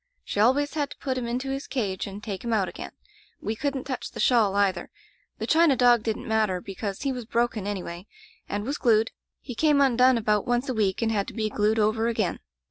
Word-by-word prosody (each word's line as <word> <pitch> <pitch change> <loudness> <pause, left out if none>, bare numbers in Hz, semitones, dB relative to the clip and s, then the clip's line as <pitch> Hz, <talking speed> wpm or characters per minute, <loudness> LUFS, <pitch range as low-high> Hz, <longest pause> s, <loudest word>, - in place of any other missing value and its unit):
She - - -3
always 265 +7 +3
had 290 -2 -1
to - - -11
put 260 -2 -2
him 250 -2 -3
into 255 +3 -2
his 275 +1 -4
cage 200 -9 -2
and 200 +1 -8
take 195 -4 -5
him 235 - -2
out 200 -4 +2
again. 175 - -7 0.5
We 220 - -3
couldn't 275 +1 -2
touch 260 -2 -4
the - - -10
shawl, 220 -6 +3
either. 195 -3 +1 0.5
The - - -3
china 320 -3 +4
dog 245 -2 +5
didn't 220 0 -3
matter, 215 -4 +1
because 195 +3 -5
he 275 - 0
was 250 -3 -5
broken, 230 -3 -1
anyway, 185 -2 -5 0.4
and 205 0 -2
was 280 +4 -3
glued. 225 -3 +3 0.3
He 250 - -7
came 295 +3 +3
undone 255 -2 +5
about 210 -2 +1
once 245 +2 +1
a 260 - -1
week 210 -1 0
and 225 - +1
had 200 -2 0
to - - -8
be 215 -2 -1
glued 210 +2 +1
over 220 +1 +2
again. 220 -7 -1
225 Hz, 220 wpm, -26 LUFS, 205-255 Hz, 0.5 s, dog